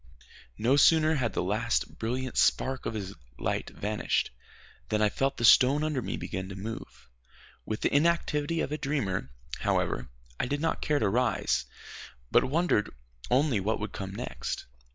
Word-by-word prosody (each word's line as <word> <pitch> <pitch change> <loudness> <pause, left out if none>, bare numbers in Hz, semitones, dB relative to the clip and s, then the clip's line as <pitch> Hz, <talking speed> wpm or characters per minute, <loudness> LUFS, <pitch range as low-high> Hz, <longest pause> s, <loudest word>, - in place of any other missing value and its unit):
No 125 +5 +3
sooner 155 +1 +5
had 125 -8 0
the - - 0
last 110 +5 -1
brilliant 125 +2 -2
spark 130 0 +2
of 110 - -3
his 100 -2 -4 0.2
light - - -2
vanished, 105 +1 -1 0.6
than 110 - +1
I 105 -1 +4
felt 135 +6 -1
the 120 - +1
stone 135 +6 +6
under 150 -4 0
me - - -3
begin 95 0 -5
to 100 - -7
move. 110 +4 -7 0.6
With 110 - -3
the - - +1
inactivity 160 0 +2
of - - -2
a 150 - -2
dreamer, 110 - -1 0.3
however, 60 +1 0 0.3
I - - 0
did 145 +3 -1
not 160 +1 -1
care 150 - +1
to - - +2
rise, 120 +5 +1 0.7
but - - +5
wondered 145 -7 +1 0.4
only 130 -3 +3
what 105 +4 -1
would 105 - -4
come 95 0 -6
next. - - -4
125 Hz, 165 wpm, -29 LUFS, 105-145 Hz, 0.7 s, stone